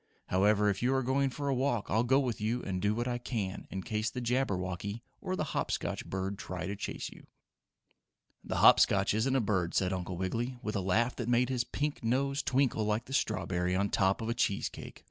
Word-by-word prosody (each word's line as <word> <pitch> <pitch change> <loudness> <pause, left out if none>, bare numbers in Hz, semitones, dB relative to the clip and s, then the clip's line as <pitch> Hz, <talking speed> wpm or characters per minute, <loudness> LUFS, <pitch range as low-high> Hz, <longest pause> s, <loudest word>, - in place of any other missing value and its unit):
However, 105 +3 +3
if 100 -1 0
you 130 +2 +2
are 130 - +1
going 135 +2 +2
for 140 +2 -4
a 140 - +2
walk 125 -4 0
I'll 110 +2 +3
go 130 +3 +4
with 120 -7 -2
you 115 +3 -1
and 90 -2 -3
do 105 +2 +1
what 120 +2 -1
I 120 -1 -1
can 105 -6 -4
in 95 -1 -5
case 110 -1 -1
the 125 - -5
Jabberwocky 100 -4 -1 0.2
or 185 - -2
the 170 - -1
Hop - - -1
Scotch - - -2
bird 95 +1 -3
try 90 -1 -5
to 100 +2 -3
chase - - -5
you." - - -16 1.2
"The - - -3
Hop - - +9
Scotch 100 0 +3
isn't 120 +5 +1
a - - +4
bird," 95 -6 0
said 95 -1 +2
Uncle 90 -1 -4
Wiggily, 115 +7 -2
with 105 - -3
a 100 - 0
laugh 110 +7 +1
that 120 -1 -3
made 120 +1 +3
his 125 -2 +1
pink 145 +3 -3
nose 140 +4 +1
twinkle 130 -5 +1
like 105 +2 0
the 135 - -8
strawberry 90 -6 0
on 100 +2 +1
top 95 +3 +2
of 110 - -3
a - - +1
cheese 100 -5 0
cake. - - -10
110 Hz, 225 wpm, -31 LUFS, 95-125 Hz, 1.2 s, Hop